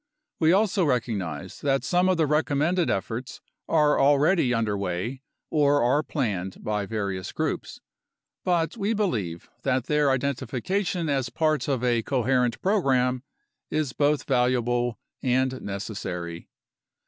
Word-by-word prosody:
We 160 0 +4
also 195 0 +3
recognize 110 - -2
that 135 -1 +1
some 180 +1 +2
of 185 - +2
the 160 - +3
recommended 155 +3 +1
efforts 115 +6 -3 0.3
are 150 -2 +3
already 145 +1 +4
under 115 -4 +1
way 100 +7 -3 0.3
or 145 -2 +3
are 130 +5 +3
planned 100 - -3
by 105 -2 -1
various 100 -4 -3
groups, - - -3 0.6
but 170 0 +1
we 220 0 -1
believe 105 - -2
that 130 -1 +1
their 150 +1 +2
identification 140 - -1
as 135 -4 0
parts 155 -3 0
of 130 -4 0
a 120 -2 +2
coherent 125 -1 +1
program 130 - +2 0.5
is 155 -4 -1
both 145 0 +2
valuable 120 -2 +1 0.2
and 130 0 +1
necessary. 90 -4 -5
130 Hz, 125 wpm, -26 LUFS, 115-150 Hz, 0.6 s, We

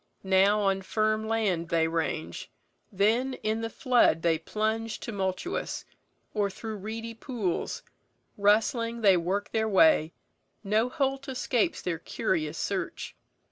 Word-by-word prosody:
Now 195 +2 +4
on 195 -1 +1
firm 215 +2 0
land 200 -7 0
they 165 -2 +2
range, 160 - -3 0.4
then 230 +7 +2
in 220 +1 0
the 225 - -2
flood 240 -9 +3
They 165 -2 +2
plunge 220 +5 -2
tumultuous; 195 - -3 0.5
or 205 -2 +1
through 215 +3 -6
reedy 225 +3 -5
pools 225 -6 -3 0.5
Rustling 230 +3 +2
they 195 -3 +6
work 185 +4 -1
their 220 0 0
way; 160 -4 +4 0.5
no 215 +4 +2
holt 275 -1 -1
escapes 250 -3 0
Their 170 -3 -2
curious 160 -3 -2
search. - - -3
210 Hz, 125 wpm, -28 LUFS, 185-225 Hz, 0.5 s, they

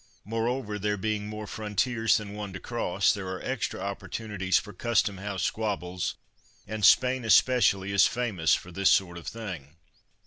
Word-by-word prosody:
Moreover, 115 0 -2
there 105 +1 0
being 105 +1 -2
more 105 0 -6
frontiers 110 +3 +1
than 105 -1 -6
one 105 -2 -6
to 95 - -6
cross, 100 -5 +1
there 100 -3 -5
are 95 0 -4
extra 130 -3 -2
opportunities 100 -1 -2
for 105 - -4
Custom 105 -1 0
house 95 -2 -3
squabbles, 95 -5 -2 0.5
and 110 -1 -5
Spain 130 +4 +5
especially 105 -3 +4
is 100 - +5
famous 105 -10 +1
for 90 - -8
this 95 +2 +2
sort 85 -2 +2
of - - -13
thing. 90 -11 -7
105 Hz, 160 wpm, -28 LUFS, 95-110 Hz, 0.5 s, Spain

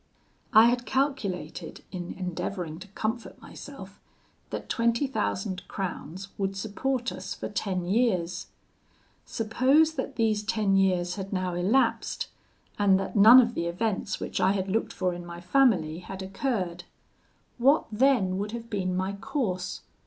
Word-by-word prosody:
"I 220 +1 +8
had 245 0 +1
calculated 240 - -2
in 180 -1 -5
endeavouring 180 -2 -4
to 190 - -10
comfort 220 +4 -4
myself, - - -11 0.5
that - - -5
twenty 235 +3 +1
thousand 190 -8 -2
crowns 190 0 -5
would 195 0 -1
support 245 +5 -2
us - - -6
for - - -5
ten 185 -3 -2
years. 185 -4 0 0.8
Suppose 260 +8 +3
that 265 -4 -4
these 220 -3 +2
ten 210 -2 +1
years 180 -2 +2
had 195 0 -5
now 185 -2 -1
elapsed, 225 +8 +1 0.5
and 195 -2 +5
that 195 - -4
none 220 +5 +10
of 240 -2 +3
the 170 -6 -2
events 200 +3 -2
which - - -3
I 185 +2 +4
had 195 -1 -2
looked 220 +4 0
for 185 -1 -1
in 175 0 -7
my 170 0 -8
family 175 - +2
had 190 +1 -7
occurred. 190 -4 -2 0.7
What 275 +6 +4
then 210 -6 +3
would 210 +2 -3
have 230 -1 -7
been 185 -3 -1
my 190 +1 -1
course? 200 -5 -3
195 Hz, 145 wpm, -27 LUFS, 185-235 Hz, 0.8 s, none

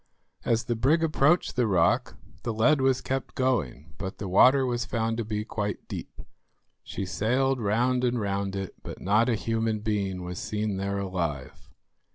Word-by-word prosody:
As 115 0 +1
the 120 - -1
brig 145 +9 +2
approached 155 +2 +2
the 125 -2 +2
rock 105 +6 +2 0.2
the 120 - -2
lead 135 +6 +4
was 130 -1 +2
kept 135 0 -3
going, 80 - -1
but 95 -2 -5
the 100 - -5
water 130 +8 +5
was 120 -1 -1
found 115 0 -1
to 115 - -1
be 105 0 -3
quite 105 -2 -4
deep. - - -7 0.6
She 100 - -5
sailed 130 +7 0
round 120 +4 +1
and 120 -1 +1
round 100 -1 -2
it, 95 -1 -4
but - - -8
not 110 +5 +2
a 120 - +2
human 115 -1 -1
being 100 -4 -2
was 90 0 -5
seen 105 -2 -2
there 100 +1 -2
alive. 85 -9 -4
110 Hz, 175 wpm, -27 LUFS, 100-125 Hz, 0.6 s, water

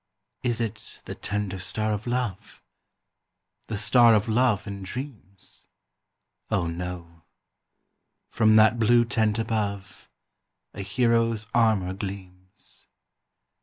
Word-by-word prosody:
Is 120 -2 -1
it 115 -3 -4
the - - -6
tender 100 -1 -3
star 110 +4 -2
of 105 +3 -5
love? 120 -6 -4 1.0
The 110 - -3
star 115 +2 +5
of 105 0 +1
love 115 -2 +2
and 100 -2 -7
dreams? 100 -3 -9 0.8
Oh, 85 - 0
no! 85 0 -6 1.1
from 110 -1 +3
that 110 +2 +5
blue 120 +1 +4
tent 110 -2 0
above, 100 -5 -3 0.6
A - - -6
hero's 115 +1 +1
armour 110 -6 +2
gleams. 95 -1 -10
105 Hz, 105 wpm, -25 LUFS, 95-115 Hz, 1.1 s, star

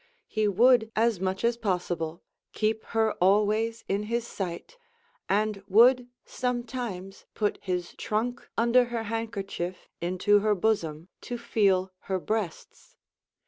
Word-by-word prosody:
He 215 -1 0
would 225 +2 +4
as 225 -3 +2
much 190 +2 -2
as 235 0 +2
possible 175 -6 -2 0.3
keep 220 0 0
her 220 -1 +1
always 215 +4 +2
in 200 +1 0
his 235 0 0
sight, 195 - -5 0.5
and 210 0 +1
would 245 +5 +6 0.2
sometimes 240 -6 -4
put 210 -1 0
his 180 -2 -3
trunk 240 +3 -3
under 235 +2 +4
her 235 -1 -3
handkerchief 205 -5 -4
into 185 +4 +3
her 210 0 +2
bosom, 175 -5 -1 0.2
to 245 - -2
feel 195 -5 +2 0.2
her 190 - +1
breasts. 210 -3 -4
215 Hz, 125 wpm, -27 LUFS, 190-230 Hz, 0.5 s, would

